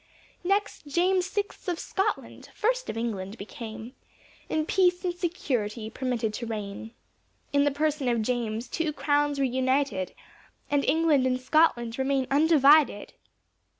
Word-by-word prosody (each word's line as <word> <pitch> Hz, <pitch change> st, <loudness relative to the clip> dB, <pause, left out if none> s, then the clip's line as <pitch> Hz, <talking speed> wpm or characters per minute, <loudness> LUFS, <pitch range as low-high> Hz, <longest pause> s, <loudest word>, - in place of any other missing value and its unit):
Next 395 Hz, -4 st, -1 dB
James 360 Hz, +5 st, +2 dB
sixth 405 Hz, +1 st, -4 dB
of 350 Hz, -, -1 dB
Scotland, 390 Hz, +4 st, -3 dB
first -, -, 0 dB
of -, -, -4 dB
England 210 Hz, -3 st, -3 dB
became 220 Hz, +3 st, -8 dB, 0.6 s
In 310 Hz, -1 st, 0 dB
peace 360 Hz, 0 st, +2 dB
and 355 Hz, -, 0 dB
security 245 Hz, -, -2 dB
permitted 240 Hz, -4 st, -2 dB
to 235 Hz, +2 st, -5 dB
reign. 215 Hz, +1 st, -6 dB, 0.6 s
In 285 Hz, 0 st, +4 dB
the -, -, +4 dB
person 295 Hz, -1 st, -1 dB
of 235 Hz, -2 st, +1 dB
James, 235 Hz, -1 st, -2 dB
two 325 Hz, -2 st, -2 dB
crowns 290 Hz, -1 st, +1 dB
were 275 Hz, -, +2 dB
united, 260 Hz, -6 st, 0 dB, 0.6 s
And 285 Hz, -1 st, +2 dB
England 300 Hz, -3 st, +3 dB
and 255 Hz, 0 st, 0 dB
Scotland 255 Hz, -4 st, +2 dB
remain 265 Hz, 0 st, +1 dB
undivided. 295 Hz, -5 st, +4 dB
275 Hz, 135 wpm, -27 LUFS, 235-325 Hz, 0.6 s, In